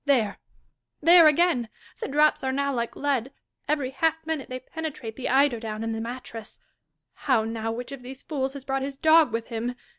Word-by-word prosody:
There! 235 Hz, -8 st, +2 dB, 0.3 s
— -, -, -54 dB
there 340 Hz, -2 st, +9 dB
again! 300 Hz, -7 st, +3 dB, 0.3 s
The -, -, -3 dB
drops 300 Hz, +1 st, +3 dB
are 265 Hz, -, 0 dB
now 280 Hz, +1 st, 0 dB
like 235 Hz, -2 st, -2 dB
lead: 270 Hz, -3 st, -1 dB, 0.4 s
every 285 Hz, -3 st, 0 dB
half 320 Hz, +4 st, +1 dB
minute 315 Hz, -4 st, -3 dB
they 255 Hz, 0 st, -4 dB
penetrate 270 Hz, -6 st, -6 dB
the 260 Hz, -, -4 dB
eider 265 Hz, -2 st, +3 dB
down 220 Hz, -1 st, -5 dB
and 225 Hz, 0 st, -2 dB
the 225 Hz, -, -3 dB
mattress. 230 Hz, -2 st, -7 dB, 0.3 s
— -, -, -55 dB
How 250 Hz, -5 st, +4 dB
now! 225 Hz, 0 st, -3 dB
which 240 Hz, +3 st, -6 dB
of 275 Hz, -2 st, -7 dB
these 260 Hz, +2 st, -10 dB
fools 270 Hz, -3 st, -2 dB
has 275 Hz, -2 st, -9 dB
brought 270 Hz, 0 st, -1 dB
his 275 Hz, 0 st, -4 dB
dog 315 Hz, -2 st, +5 dB
with 230 Hz, 0 st, -3 dB
him 235 Hz, +1 st, -3 dB
265 Hz, 205 wpm, -26 LUFS, 230-285 Hz, 0.4 s, there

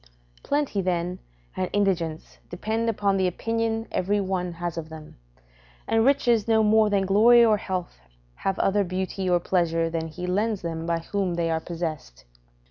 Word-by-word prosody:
Plenty, 285 Hz, -8 st, -1 dB
then, 180 Hz, 0 st, -2 dB, 0.4 s
and 185 Hz, -, -2 dB
indigence 175 Hz, -6 st, -1 dB
depend 220 Hz, +6 st, -2 dB
upon 200 Hz, -3 st, +1 dB
the 190 Hz, -1 st, +2 dB
opinion 225 Hz, +4 st, -2 dB
every 205 Hz, +3 st, 0 dB
one 185 Hz, -2 st, -2 dB
has 170 Hz, 0 st, -4 dB
of 165 Hz, -1 st, -6 dB
them; 155 Hz, -1 st, -11 dB, 0.7 s
and 225 Hz, 0 st, +2 dB
riches 240 Hz, -5 st, +3 dB
no 220 Hz, -1 st, +4 dB
more 215 Hz, 0 st, +4 dB
than 200 Hz, -1 st, +1 dB
glory 230 Hz, +5 st, +6 dB
or 215 Hz, -2 st, +4 dB
health 185 Hz, -, -5 dB, 0.4 s
have 195 Hz, 0 st, -2 dB
other 200 Hz, +1 st, +2 dB
beauty 185 Hz, +1 st, -3 dB
or 175 Hz, -1 st, +3 dB
pleasure 165 Hz, -2 st, 0 dB
than 165 Hz, -1 st, -2 dB
he 180 Hz, +3 st, -7 dB
lends 205 Hz, +2 st, -1 dB
them 165 Hz, -1 st, -4 dB
by 170 Hz, 0 st, +1 dB
whom 190 Hz, 0 st, -2 dB
they 170 Hz, -1 st, 0 dB
are 160 Hz, -, 0 dB
possessed. 155 Hz, -, -6 dB
185 Hz, 165 wpm, -25 LUFS, 170-215 Hz, 0.7 s, glory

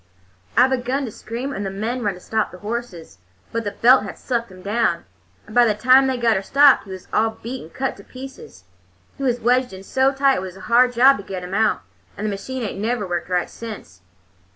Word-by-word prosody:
"I 250 Hz, +2 st, +7 dB
begun 265 Hz, +1 st, -1 dB
to 230 Hz, -, -6 dB
scream, 245 Hz, +7 st, -5 dB
and 200 Hz, -, -4 dB
the 195 Hz, -, -2 dB
men 220 Hz, +6 st, -3 dB
run 205 Hz, -4 st, -1 dB
to -, -, -12 dB
stop 220 Hz, +3 st, -1 dB
the 180 Hz, -, -12 dB
horses, 210 Hz, -, -6 dB, 0.3 s
but 230 Hz, 0 st, -2 dB
the 205 Hz, -, -2 dB
belt 245 Hz, +6 st, +5 dB
had -, -, -7 dB
sucked 235 Hz, -4 st, -3 dB
him 185 Hz, 0 st, -13 dB
down, 205 Hz, -5 st, 0 dB, 0.4 s
and 215 Hz, -, -13 dB
by 245 Hz, +1 st, +6 dB
the 220 Hz, -3 st, +2 dB
time 255 Hz, +5 st, +5 dB
they 260 Hz, -1 st, 0 dB
got 235 Hz, -2 st, +2 dB
her 190 Hz, -, 0 dB
stopped 275 Hz, +6 st, +5 dB
he -, -, -14 dB
was 185 Hz, -1 st, -9 dB
all 220 Hz, 0 st, +1 dB
beat 250 Hz, +3 st, -5 dB
and 160 Hz, -, -12 dB
cut 265 Hz, 0 st, -3 dB
to -, -, -13 dB
pieces. 270 Hz, -, -11 dB, 0.6 s
He -, -, -4 dB
was 245 Hz, -2 st, +1 dB
wedged 250 Hz, 0 st, +1 dB
in 190 Hz, 0 st, -9 dB
so 265 Hz, +6 st, +2 dB
tight 275 Hz, 0 st, +2 dB
it -, -, -2 dB
was 190 Hz, 0 st, -8 dB
a -, -, -12 dB
hard 245 Hz, +4 st, +3 dB
job 260 Hz, +3 st, +6 dB
to 200 Hz, -, -8 dB
get 190 Hz, -2 st, -6 dB
him 180 Hz, +1 st, -7 dB
out, 220 Hz, +2 st, +2 dB, 0.4 s
and 210 Hz, -, -4 dB
the 215 Hz, -, 0 dB
machine 250 Hz, +6 st, -5 dB
ain't 200 Hz, -2 st, -4 dB
never 220 Hz, -1 st, -1 dB
worked 175 Hz, 0 st, -3 dB
right 180 Hz, -1 st, 0 dB
since." 200 Hz, -, -10 dB
230 Hz, 240 wpm, -21 LUFS, 195-255 Hz, 0.6 s, I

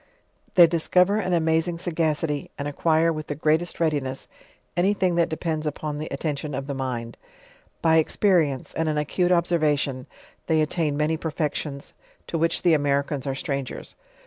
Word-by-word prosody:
They 175 Hz, -, +9 dB
discover 180 Hz, +4 st, +2 dB
an 185 Hz, -4 st, -1 dB
amazing 165 Hz, +1 st, +1 dB
sagacity, 160 Hz, -3 st, -1 dB
and 145 Hz, -, -3 dB
acquire 160 Hz, +3 st, +2 dB
with 155 Hz, -1 st, -6 dB
the 145 Hz, -, -3 dB
greatest 155 Hz, +3 st, 0 dB
readiness, 145 Hz, -5 st, -1 dB, 0.5 s
any 190 Hz, +4 st, +2 dB
thing 185 Hz, -2 st, +1 dB
that 170 Hz, -1 st, +2 dB
depends 160 Hz, -1 st, -2 dB
upon 150 Hz, 0 st, -4 dB
the 155 Hz, -, -4 dB
atten 145 Hz, +2 st, -2 dB
t'on 145 Hz, -1 st, -5 dB
of 135 Hz, -, -4 dB
the 140 Hz, -, -4 dB
mind. 125 Hz, -3 st, -4 dB, 0.7 s
By 160 Hz, -1 st, +5 dB
experience, 160 Hz, -4 st, +2 dB
and 160 Hz, -1 st, 0 dB
an 150 Hz, -, -1 dB
acute 175 Hz, +4 st, +1 dB
observation, 155 Hz, -6 st, +1 dB, 0.4 s
they 160 Hz, -1 st, +3 dB
attain 155 Hz, -1 st, 0 dB
many 155 Hz, +2 st, +1 dB
perfections, 150 Hz, -3 st, -3 dB, 0.3 s
to 165 Hz, -, -3 dB
which 165 Hz, +1 st, +1 dB
the 175 Hz, -, +5 dB
Americans 140 Hz, -1 st, 0 dB
are 135 Hz, -, -1 dB
strangers. 140 Hz, -1 st, -4 dB
155 Hz, 160 wpm, -24 LUFS, 145-170 Hz, 0.7 s, They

